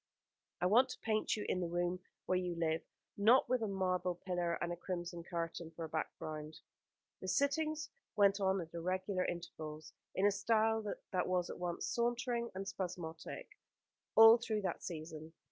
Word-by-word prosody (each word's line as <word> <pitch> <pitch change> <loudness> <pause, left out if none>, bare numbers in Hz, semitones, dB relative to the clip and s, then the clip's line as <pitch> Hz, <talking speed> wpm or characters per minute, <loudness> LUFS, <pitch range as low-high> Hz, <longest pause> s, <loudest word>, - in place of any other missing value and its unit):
"I - - +2
want 240 +8 +6
to - - -7
paint 215 0 +1
you 210 - -3
in 185 - +1
the 175 - -1
room 175 +1 0 0.3
where 185 - +2
you 180 -1 -2
live; 165 -1 +1 0.4
not 225 +6 +6
with 255 -1 +1
a 220 - 0
marble 185 -2 0
pillar 175 -1 -1
and 175 +1 -2
a - - -3
crimson 175 -1 -4
curtain 170 -1 -4
for 165 0 -6
a - - -8
background." 155 0 -4 0.6
The 185 - -6
sittings 305 - +1 0.2
went 200 0 +5
on 190 0 +3
at 165 -1 -9
irregular 185 +2 -1
intervals, 155 -3 -6 0.2
in 190 - +3
a 205 - +6
style 220 +2 +2 0.3
that 185 - +1
was 180 -1 +1
at - - -8
once 175 -1 -2
sauntering 240 0 0
and 195 +1 -4
spasmodic, 175 -4 -5 0.6
all 225 +1 +10
through 220 -3 -1
that 185 - -2
season. 160 -1 -7
185 Hz, 170 wpm, -36 LUFS, 170-215 Hz, 0.6 s, all